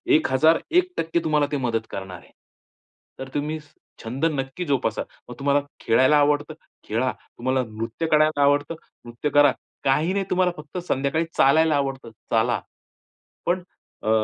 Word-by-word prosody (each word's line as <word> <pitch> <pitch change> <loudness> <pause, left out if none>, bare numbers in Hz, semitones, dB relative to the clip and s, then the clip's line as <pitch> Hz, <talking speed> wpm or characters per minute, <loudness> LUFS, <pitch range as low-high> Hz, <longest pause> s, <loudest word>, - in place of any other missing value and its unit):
1001% 170 - +2
तुम्हाला 150 -2 +2
ते 145 - 0
मदत 115 -4 -1
करणार 95 -1 -6
आहे. - - -21 0.9
तर 135 - -6
तुम्ही 150 +2 -2 0.5
छंद 125 +7 -2
नक्की 145 +2 -2
जोपासा. 130 -7 0 0.3
मग 125 - -7
तुम्हाला 140 +1 +2 0.2
खेळायला 130 +6 +4
आवडतं, 145 +1 +2 0.3
खेळा. 125 +4 0 0.3
तुम्हाला 130 +1 0
नृत्य 115 +8 -4
करायला 155 -1 +4
आवडतं, 145 +3 +2 0.3
नृत्य 120 +5 -3
करा. 145 -1 +6 0.3
काही 150 +7 +2
नाही 195 -1 0
तुम्हाला 185 0 +2
फक्त 150 +4 -10
संध्याकाळी 140 +5 0
चालायला 155 +3 +5
आवडतं, 135 -4 -2 0.2
चाला. 115 +2 +2 0.8
पण 180 +1 0 0.4
अ, - - -1
145 Hz, 135 wpm, -24 LUFS, 130-160 Hz, 0.9 s, करा